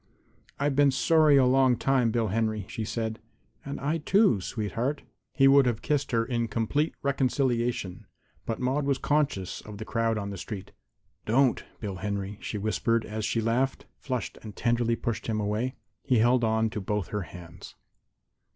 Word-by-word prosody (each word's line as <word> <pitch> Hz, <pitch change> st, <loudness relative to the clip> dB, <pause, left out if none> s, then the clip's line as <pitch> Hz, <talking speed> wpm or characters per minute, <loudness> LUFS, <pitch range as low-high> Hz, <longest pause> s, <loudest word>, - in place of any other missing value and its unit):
"I've 140 Hz, 0 st, +1 dB
been 145 Hz, 0 st, +5 dB
sorry 150 Hz, +2 st, +4 dB
a 130 Hz, -, +5 dB
long 130 Hz, -1 st, +4 dB
time, 130 Hz, -2 st, +2 dB
Bill 115 Hz, -1 st, 0 dB
Henry," 110 Hz, -1 st, -1 dB
she 110 Hz, -, -4 dB
said. 110 Hz, 0 st, -3 dB, 0.4 s
"And 140 Hz, 0 st, -5 dB
I, 150 Hz, +4 st, -1 dB
too, 180 Hz, -, +3 dB
sweetheart." 115 Hz, +8 st, -3 dB, 0.3 s
He 135 Hz, -2 st, +5 dB
would 135 Hz, -1 st, +6 dB
have 115 Hz, -2 st, -1 dB
kissed 145 Hz, -1 st, 0 dB
her 115 Hz, -1 st, +2 dB
in 115 Hz, -1 st, -1 dB
complete 115 Hz, +8 st, 0 dB
reconciliation, 125 Hz, -7 st, 0 dB, 0.4 s
but 115 Hz, -, -2 dB
Maude 135 Hz, +3 st, 0 dB
was 140 Hz, -2 st, +2 dB
conscious 140 Hz, -13 st, 0 dB
of 105 Hz, -1 st, -10 dB
the 110 Hz, -, -6 dB
crowd 115 Hz, 0 st, 0 dB
on 100 Hz, -1 st, -4 dB
the 100 Hz, -, -6 dB
street. 100 Hz, -1 st, -7 dB, 0.6 s
"Don't, 125 Hz, +3 st, +3 dB, 0.2 s
Bill 100 Hz, -4 st, -5 dB
Henry," 100 Hz, +1 st, -4 dB
she 105 Hz, -, -4 dB
whispered 110 Hz, +2 st, 0 dB
as 110 Hz, 0 st, -4 dB
she 115 Hz, -, 0 dB
laughed, 125 Hz, +4 st, 0 dB
flushed 130 Hz, -4 st, -4 dB
and 110 Hz, -2 st, -9 dB
tenderly 120 Hz, 0 st, +1 dB
pushed 115 Hz, -1 st, -3 dB
him 110 Hz, -2 st, -1 dB
away. 105 Hz, +5 st, -1 dB, 0.3 s
He 125 Hz, -, +2 dB
held 120 Hz, +2 st, +4 dB
on 110 Hz, 0 st, +1 dB
to 105 Hz, -, -4 dB
both 105 Hz, -1 st, -2 dB
her 105 Hz, -, -2 dB
hands. 85 Hz, -1 st, -11 dB
115 Hz, 170 wpm, -27 LUFS, 110-135 Hz, 0.6 s, would